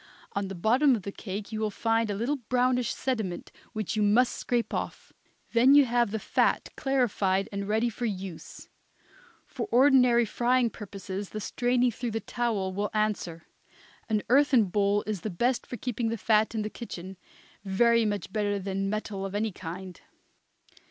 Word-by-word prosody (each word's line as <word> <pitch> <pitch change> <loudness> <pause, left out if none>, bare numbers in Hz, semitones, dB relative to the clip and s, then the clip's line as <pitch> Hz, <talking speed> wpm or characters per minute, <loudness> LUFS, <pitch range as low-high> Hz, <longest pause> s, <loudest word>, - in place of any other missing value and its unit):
On 200 -1 -1
the 195 - -6
bottom 250 - +3
of 210 - -5
the 200 - -5
cake 200 +1 -6
you 215 - -3
will 215 -1 0
find 225 +1 0
a 205 - -1
little 245 +8 -1
brownish 250 0 +1
sediment 220 -9 -3 0.2
which 215 -3 -3
you 215 - +1
must 220 +5 +4
scrape 235 -3 -1
off. - - -5 0.4
Then 250 +4 +6
you 290 -1 +7
have 240 -2 +2
the 220 - -2
fat 210 - +1
clarified 205 -8 +1
and 200 0 -4
ready 220 +3 +1
for 240 +1 -4
use. 190 -5 -6 0.8
For - - -5
ordinary 250 -2 +5
frying 240 +1 +1
purposes 200 -1 -7
the 215 - -5
straining 245 +3 +1
through 240 +2 -4
the 225 0 -2
towel 220 -4 -2
will 205 +2 -1
answer. 205 -6 -1 0.7
An 215 -1 +1
earthen 255 -5 +4
bowl 205 +1 +2
is 210 -4 -3
the 215 - -3
best 240 +7 0
for 245 - -6
keeping 235 0 -2
the 230 - -2
fat 220 +1 +2
in 215 - 0
the 210 - -4
kitchen, 190 -5 -8 0.5
very 230 +4 +3
much 205 -3 -2
better 205 -1 0
than 195 0 -2
metal 210 -2 -3
of 195 0 -4
any 215 +1 0
kind. 180 0 -8
215 Hz, 170 wpm, -28 LUFS, 200-240 Hz, 0.8 s, you